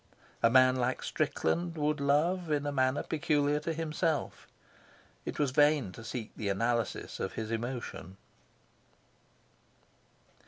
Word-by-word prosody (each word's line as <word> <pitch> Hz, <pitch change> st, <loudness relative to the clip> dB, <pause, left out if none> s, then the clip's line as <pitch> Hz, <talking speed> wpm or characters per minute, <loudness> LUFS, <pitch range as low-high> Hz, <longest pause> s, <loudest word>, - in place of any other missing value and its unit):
A 115 Hz, -, +5 dB
man 130 Hz, +1 st, +5 dB
like 125 Hz, +1 st, -1 dB
Strickland 165 Hz, +3 st, -1 dB
would 150 Hz, 0 st, 0 dB
love 160 Hz, +5 st, +1 dB
in 145 Hz, -1 st, 0 dB
a 145 Hz, -, -1 dB
manner 130 Hz, +1 st, +1 dB
peculiar 150 Hz, -2 st, +1 dB
to 165 Hz, -, -3 dB
himself. 160 Hz, -1 st, -2 dB, 0.8 s
It -, -, -4 dB
was 145 Hz, -3 st, +1 dB
vain 145 Hz, -6 st, +3 dB
to 115 Hz, -, -11 dB
seek 115 Hz, -1 st, -5 dB
the 105 Hz, -, -3 dB
analysis 115 Hz, +3 st, -1 dB
of -, -, -3 dB
his 110 Hz, 0 st, -4 dB
emotion. 115 Hz, -5 st, -5 dB
140 Hz, 125 wpm, -31 LUFS, 120-150 Hz, 0.8 s, A